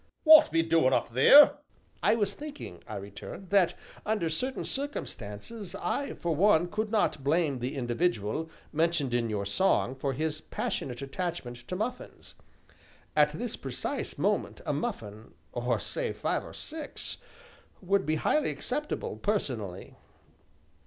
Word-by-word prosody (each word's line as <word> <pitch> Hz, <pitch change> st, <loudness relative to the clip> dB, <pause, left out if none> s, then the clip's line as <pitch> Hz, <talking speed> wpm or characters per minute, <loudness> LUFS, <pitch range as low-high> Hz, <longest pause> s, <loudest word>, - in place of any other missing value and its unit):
"W'at 310 Hz, 0 st, +9 dB
be 165 Hz, 0 st, +2 dB
doin' 165 Hz, -5 st, +3 dB
up -, -, +1 dB
theer?" 140 Hz, -, +8 dB, 0.4 s
"I -, -, +4 dB
was 205 Hz, -3 st, 0 dB
thinking," 290 Hz, -, -9 dB
I -, -, -6 dB
returned, 100 Hz, -, -8 dB
"that, 195 Hz, -3 st, +4 dB, 0.3 s
under 210 Hz, -6 st, 0 dB
certain 255 Hz, +11 st, -2 dB
circumstances, 210 Hz, -, -5 dB
I, 280 Hz, -, -2 dB
for 170 Hz, -2 st, -1 dB
one, 175 Hz, -1 st, +4 dB
could 215 Hz, +2 st, -2 dB
not 205 Hz, -10 st, +1 dB
blame 145 Hz, -2 st, +1 dB
the 125 Hz, +4 st, -3 dB
individual, 130 Hz, -, -1 dB, 0.2 s
mentioned 160 Hz, -5 st, +1 dB
in 120 Hz, -1 st, +1 dB
your 100 Hz, -2 st, -2 dB
song, 130 Hz, -, +2 dB
for 135 Hz, +1 st, -2 dB
his 155 Hz, +2 st, -2 dB
passionate 130 Hz, -4 st, -4 dB
attachment 140 Hz, -4 st, -4 dB
to 180 Hz, -, -3 dB
muffins. 220 Hz, +6 st, -5 dB, 0.8 s
At 150 Hz, -1 st, +5 dB
this 235 Hz, +7 st, -3 dB
precise 135 Hz, -3 st, -4 dB
moment -, -, 0 dB
a -, -, 0 dB
muffin 105 Hz, +2 st, -5 dB, 0.2 s
or, 120 Hz, 0 st, 0 dB
say, -, -, -3 dB
five -, -, -1 dB
or -, -, -10 dB
six, 310 Hz, -1 st, -6 dB, 0.6 s
would 195 Hz, +1 st, +1 dB
be 155 Hz, -2 st, 0 dB
highly 300 Hz, -, +1 dB
acceptable, 295 Hz, +4 st, -3 dB
personally." 120 Hz, -, -3 dB
160 Hz, 140 wpm, -29 LUFS, 125-210 Hz, 0.8 s, W'at